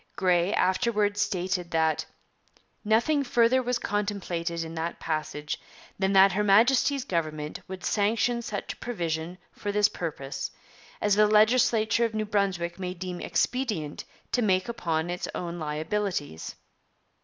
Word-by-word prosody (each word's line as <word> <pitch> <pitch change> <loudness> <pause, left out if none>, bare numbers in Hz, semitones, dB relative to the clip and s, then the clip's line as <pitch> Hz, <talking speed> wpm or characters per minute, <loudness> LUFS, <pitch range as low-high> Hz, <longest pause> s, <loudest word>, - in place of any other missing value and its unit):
Grey 180 -1 +2
afterwards 210 +1 +1
stated 180 -2 -1
'that 160 -1 +1 0.8
nothing 235 +7 +2
further 245 0 +3
was 250 0 0
contemplated 185 -6 -2
in 160 0 -7
that 165 +1 -4
passage 150 -1 -3 0.4
than 190 0 +2
that 195 0 +7
Her 205 +3 0
Majesty's 245 +6 +4
Government 155 - -3
would 190 -1 -7
sanction 230 +3 +1
such 210 -3 -4
a - - -22
provision 170 -6 -3
for 205 - -4
this 210 0 +4
purpose 145 -4 -4 0.5
as 205 -1 +3
the 210 0 +5
legislature 220 +1 +4
of 225 -1 -1
New 215 0 0
Brunswick 195 -4 -1
may 180 -1 -4
deem 180 0 -5
expedient 215 - -1 0.3
to 245 - +2
make 185 -4 +2
upon 175 -8 -1
its 180 - -3
own 175 0 -4
liabilities.' 155 - -3
195 Hz, 135 wpm, -27 LUFS, 170-215 Hz, 0.8 s, that